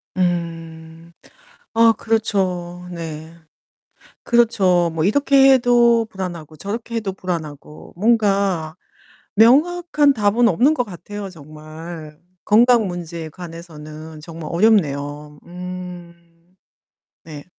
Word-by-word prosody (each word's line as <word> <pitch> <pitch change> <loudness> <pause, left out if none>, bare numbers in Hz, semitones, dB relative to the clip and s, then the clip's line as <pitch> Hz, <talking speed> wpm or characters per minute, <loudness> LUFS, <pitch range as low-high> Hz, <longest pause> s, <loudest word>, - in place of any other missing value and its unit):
음. 165 -2 -4 0.6
아 230 0 +5
그렇죠. 185 -5 -2
네. 160 -1 -7 0.9
그렇죠. 190 -8 +3
뭐 160 -1 -1
이렇게 270 +3 +5
해도 240 -2 +4
불안하고 175 -5 -7
저렇게 230 +5 -5
해도 205 -4 -2
불안하고 155 -5 -7
뭔가 195 -6 +1 0.6
명확한 295 - +4
답은 225 +2 +3
없는 250 - +3
것 245 - 0
같아요 200 +1 -8
정말. 155 0 -11 0.3
건강 230 0 +4
문제에 170 -2 -6
관해서는 160 -2 -10
정말 165 0 -9
어렵네요. 150 -7 +1
음. 175 -1 -10 0.7
네. 150 -3 -10
180 Hz, 205 characters per minute, -20 LUFS, 160-220 Hz, 0.9 s, 아